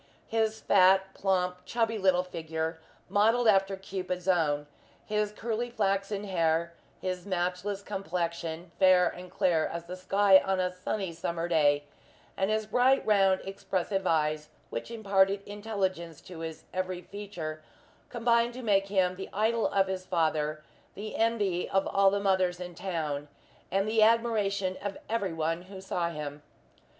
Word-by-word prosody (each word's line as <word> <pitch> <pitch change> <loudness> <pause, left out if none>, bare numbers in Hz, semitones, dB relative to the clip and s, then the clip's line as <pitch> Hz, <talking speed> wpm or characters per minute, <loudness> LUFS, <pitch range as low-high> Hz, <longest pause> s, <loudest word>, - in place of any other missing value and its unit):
His 220 -1 0
fat, 190 0 +4
plump, 180 -2 0
chubby 225 -2 -1
little 185 -2 +3
figure, 160 -2 -4 0.3
modelled 225 +4 +3
after 195 -2 +4
Cupid's 185 -1 -5
own; 150 -5 +2 0.4
his 210 -1 0
curly 230 +2 -3
flaxen 200 -2 -1
hair; 170 -3 0 0.3
his 185 0 -4
matchless 185 +2 -2
complexion, 170 -3 -3
fair 185 -2 +6
and 180 +1 -6
clear 165 -3 +2
as 170 - -5
the 180 +2 -6
sky 190 +1 +5
on 190 -1 0
a 180 0 +1
sunny 185 0 -3
summer 170 0 -3
day; 145 -4 +3 0.5
and 195 +1 0
his 215 0 0
bright, 250 +5 +3
round, 195 -3 +4
expressive 195 0 -2
eyes, 155 -1 +1 0.2
which 115 - -4
imparted 200 -3 +2
intelligence 195 -6 -3
to 180 -3 -10
his 160 -1 -6
every 185 -1 -3
feature, 175 -7 -6 0.5
combined 235 0 +2
to 255 - -7
make 195 -3 +2
him 185 -2 +1
the 190 - -6
idol 220 +2 +1
of 195 -1 +2
his 190 -1 -4
father, 155 -3 0 0.3
the 215 +2 -6
envy 210 -6 +1
of 195 0 +2
all 195 0 +4
the 200 +1 0
mothers 185 -3 +1
in 180 -1 -6
town, 160 -5 -3 0.4
and 195 +2 +1
the 220 0 +2
admiration 215 -4 +2
of 200 -1 -4
every 215 -5 -1
one 165 +1 -1
who 190 +1 -10
saw 180 -3 -2
him. 150 -2 -6
190 Hz, 150 wpm, -29 LUFS, 170-205 Hz, 0.5 s, fair